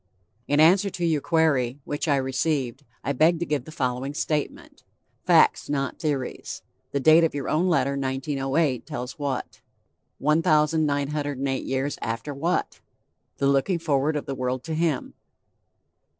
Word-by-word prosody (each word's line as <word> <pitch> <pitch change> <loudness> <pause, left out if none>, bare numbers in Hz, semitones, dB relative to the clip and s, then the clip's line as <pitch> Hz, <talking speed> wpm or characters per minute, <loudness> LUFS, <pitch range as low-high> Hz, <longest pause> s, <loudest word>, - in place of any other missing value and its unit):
"In 145 +1 +2
answer 185 +6 +5
to 175 -2 -3
your 160 -3 +1
query, 145 -6 +1
which 145 +3 -3
I 145 - +3
received, 135 0 -1 0.2
I 140 - -1
beg 160 +5 +4
to 170 - -1
give 145 -5 -2
the - - -10
following 130 -1 -2
statement. 150 -1 -3 0.5
Facts, - - +4
not 140 -2 -2
theories. 145 -5 -3 0.3
The 140 - 0
date 160 +4 +6
of 160 - +1
your 140 -2 -3
own 175 +4 +1
letter 140 -5 +2
1908 135 0 -1
tells 130 -3 -6
what? 140 -3 -4 0.6
1908 150 -3 +1
years 135 +2 -2
after 115 +6 -3
what? 165 +6 -1 0.6
The 140 - 0
looking 140 +6 +2
forward 150 -2 0
of 150 - -3
the 135 - -4
world 130 -1 -2
to 160 - -4
Him." 160 -3 -1
145 Hz, 145 wpm, -25 LUFS, 135-155 Hz, 0.6 s, date